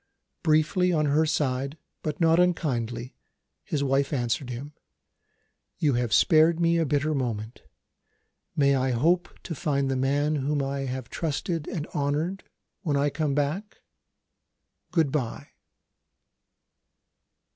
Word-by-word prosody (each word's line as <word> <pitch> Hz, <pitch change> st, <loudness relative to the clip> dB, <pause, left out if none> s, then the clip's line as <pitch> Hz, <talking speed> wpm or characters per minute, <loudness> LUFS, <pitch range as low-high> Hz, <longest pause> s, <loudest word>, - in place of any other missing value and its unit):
Briefly 155 Hz, +4 st, +3 dB
on 155 Hz, -3 st, +2 dB
her 150 Hz, +2 st, +3 dB
side, 140 Hz, -1 st, -1 dB, 0.2 s
but 150 Hz, -1 st, -3 dB
not 165 Hz, 0 st, +4 dB
unkindly, 125 Hz, -9 st, 0 dB, 0.5 s
his 145 Hz, -2 st, -2 dB
wife 135 Hz, 0 st, +1 dB
answered 125 Hz, -1 st, -1 dB
him: 135 Hz, +5 st, -6 dB, 1.0 s
"You 145 Hz, -3 st, +2 dB
have 120 Hz, -2 st, 0 dB
spared 160 Hz, +8 st, +5 dB
me 170 Hz, 0 st, +3 dB
a 165 Hz, -, +1 dB
bitter 145 Hz, +2 st, +1 dB
moment. 115 Hz, -4 st, -3 dB, 0.9 s
May 140 Hz, -1 st, +4 dB
I 130 Hz, -1 st, +1 dB
hope 170 Hz, +9 st, +2 dB
to 170 Hz, -, -5 dB
find 140 Hz, -2 st, 0 dB
the -, -, 0 dB
man 145 Hz, +3 st, +1 dB
whom 145 Hz, +2 st, 0 dB
I 135 Hz, 0 st, -2 dB
have 130 Hz, -1 st, -5 dB
trusted 160 Hz, 0 st, -2 dB
and 155 Hz, -3 st, -3 dB
honoured, 150 Hz, +7 st, -1 dB, 0.4 s
when 145 Hz, -5 st, 0 dB
I 145 Hz, +1 st, +2 dB
come 150 Hz, -3 st, -1 dB
back? 150 Hz, +9 st, -2 dB, 1.1 s
Good 160 Hz, -6 st, +2 dB
bye." 130 Hz, -6 st, -3 dB
145 Hz, 125 wpm, -26 LUFS, 135-160 Hz, 1.1 s, spared